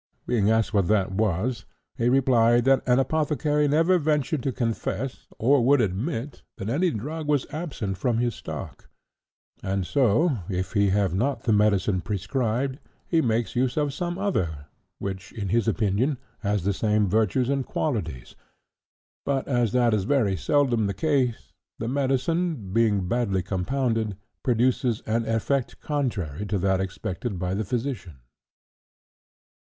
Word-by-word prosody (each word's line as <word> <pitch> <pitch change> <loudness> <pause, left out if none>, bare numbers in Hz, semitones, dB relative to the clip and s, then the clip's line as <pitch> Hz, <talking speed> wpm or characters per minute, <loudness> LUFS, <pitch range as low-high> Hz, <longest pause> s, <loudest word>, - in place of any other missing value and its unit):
Being 105 -4 +2
asked 110 0 +2
what 100 -4 +2
that 100 -3 +2
was, 105 +4 -1 0.3
he 120 +1 +1
replied 120 -2 +4
that 135 0 +4
an 125 0 +4
apothecary 150 +1 +1
never 165 +5 +3
ventured 150 -1 0
to 135 - -1
confess, 120 +2 -3
or 130 +2 +3
would 140 +3 +5
admit, 115 - -2 0.2
that 95 - -4
any 170 +9 +2
drug 150 +5 -4
was 145 -3 +2
absent 135 - -4
from 120 +1 +1
his 120 0 0
stock; - - -8 0.7
and 95 -1 -1
so, 130 - +2
if 95 0 -3
he 100 -2 +3
have 95 -2 +1
not 125 +8 0
the 115 - +2
medicine 105 -2 +2
prescribed, 125 - -1 0.3
he 165 -2 +2
makes 115 -3 0
use 125 +2 0
of 145 -2 +1
some 175 +3 -3
other 85 - -1 0.3
which, 95 0 -6
in 100 -5 -4
his 115 +3 +1
opinion, 115 +6 +1 0.2
has 105 -3 -1
the 100 +2 +1
same 105 0 +1
virtues 110 +5 +2
and 135 -1 -1
qualities; 85 - -3 0.9
but 135 -1 -1
as 120 -5 +1
that 120 -2 +3
is 100 -3 +1
very 110 -7 +2
seldom 120 - +2
the 100 - -3
case, 135 -7 0 0.2
the 115 - -4
medicine, 135 - 0
being 105 -5 +2
badly 100 -4 0
compounded, 110 +2 -1 0.2
produces 125 -1 +1
an 115 +1 -1
effect 115 +4 -1
contrary 105 - -2
to 105 0 -1
that 95 0 +1
expected 95 +2 -4
by 90 +1 -2
the 105 +3 -1
physician. 115 - -3
115 Hz, 145 wpm, -25 LUFS, 100-135 Hz, 0.9 s, would